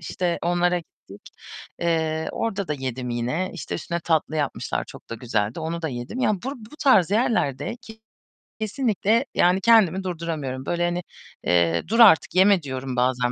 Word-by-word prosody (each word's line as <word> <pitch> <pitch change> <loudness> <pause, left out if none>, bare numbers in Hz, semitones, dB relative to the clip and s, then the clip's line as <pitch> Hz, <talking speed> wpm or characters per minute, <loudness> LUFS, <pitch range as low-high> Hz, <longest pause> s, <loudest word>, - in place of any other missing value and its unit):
İşte 175 +1 -2
onlara 175 +1 +2
gittik. 105 - -15 0.5
Eee, 160 -2 0
orda 200 -4 -3
da - - 0
yedim 130 -2 -4
yine. 125 +10 -2
İşte 170 - -6
üstüne 170 +1 -4
tatlı 160 -1 0
yapmışlar. 145 -2 -2
Çok - - -14
da 115 - -3
güzeldi. 110 +1 -2
Onu 165 +1 -4
da 160 - -1
yedim. 125 - -6
Ya 215 - +3
bur 250 +9 -5
bu 230 +6 -14
tarz 200 - +4
yerlerde 215 - 0 0.9
kesinlikle 220 +1 +1
yani 180 +2 +3
kendimi 195 -5 +4
durduramıyorum. 155 -7 -4
Böyle 175 0 0
hani, 175 0 -2 0.4
eee, 85 -1 +2
"Dur 230 +3 0
artık 205 -7 +6
yeme." 190 0 +5
diyorum 130 -1 -5
bazen 125 0 +1
170 Hz, 160 wpm, -24 LUFS, 130-195 Hz, 0.9 s, artık